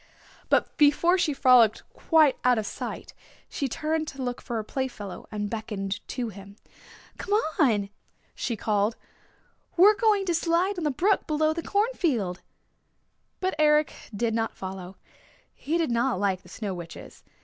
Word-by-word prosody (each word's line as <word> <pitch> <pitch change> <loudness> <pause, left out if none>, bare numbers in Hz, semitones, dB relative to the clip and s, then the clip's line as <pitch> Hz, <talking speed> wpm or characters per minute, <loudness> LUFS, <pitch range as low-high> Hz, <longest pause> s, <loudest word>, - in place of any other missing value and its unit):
But - - +2
before 335 +5 +4
she 330 -3 +2
frolicked 250 -5 +5
quite 315 -5 +4
out 250 -1 +4
of 215 - -1
sight - - -6 0.3
she 275 - -3
turned 310 +4 -2
to 270 -2 -6
look 245 -1 -3
for 240 - -5
her 220 - -1
playfellow, 215 -5 -5
and 210 -1 -3
beckoned 205 -2 -4
to 245 -3 -3
him. 200 0 -12 0.6
"Come 410 +2 +1 0.2
on," 215 -9 +3 0.4
she 235 - -3
called. 210 0 0 0.8
"We're 400 +5 +8
going 415 -2 +2
to 350 - 0
slide 345 +3 +1
on 325 - -3
the - - +2
brook 360 +10 +1
below 310 0 +1
the 335 - -4
cornfield." 325 - 0 1.0
But 375 0 0
Eric 300 0 +4 0.2
did 225 +2 -1
not 225 0 -2
follow. 190 0 -7 0.6
He 315 +4 -2
did 325 -7 0
not 235 -3 +1
like 195 -2 0
the - - -18
Snow 205 -4 -5
Witches. 170 -2 -10
255 Hz, 155 wpm, -26 LUFS, 210-325 Hz, 1.0 s, We're